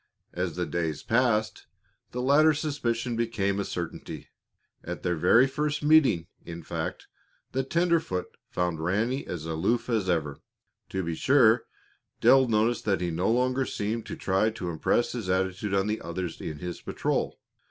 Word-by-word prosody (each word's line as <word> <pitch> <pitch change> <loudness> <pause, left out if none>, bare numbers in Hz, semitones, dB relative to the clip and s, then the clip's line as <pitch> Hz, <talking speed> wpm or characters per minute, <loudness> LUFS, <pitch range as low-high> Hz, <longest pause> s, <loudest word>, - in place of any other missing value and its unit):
As 90 -2 -2
the 90 0 -1
days 80 -4 -2
passed, 115 -2 +1 0.4
the 125 +1 -4
latter 150 +3 +5
suspicion 125 -6 -2
became 110 -4 0
a - - 0
certainty. 85 -3 -6 0.5
At - - -6
their 90 - +1
very 90 +10 +5
first 150 +2 -2
meeting, 150 - +5 0.2
in 85 0 -8
fact, - - -4 0.5
the 135 - 0
tenderfoot 165 - 0
found 90 -3 -1
Ranny 115 +10 0
as 80 -3 -5
aloof 95 +11 0
as 105 -5 0
ever. 75 -5 -1 0.5
To 95 0 -2
be 85 -1 -2
sure, 120 - +4 0.5
Dale 135 -1 +6
noticed 115 +1 +1
that 100 -2 +2
he 90 -1 -1
no 85 +5 0
longer 125 +3 +2
seemed 110 -1 -3
to - - -5
try 95 +3 +1
to 105 -6 -5
impress 85 +8 +1
his 115 -7 -4
attitude 95 +2 0
on 95 0 +2
the 105 +1 -2
others 85 0 -5
in 75 - -5
his 90 +3 -6
patrol. - - -2
105 Hz, 160 wpm, -27 LUFS, 90-125 Hz, 0.5 s, Dale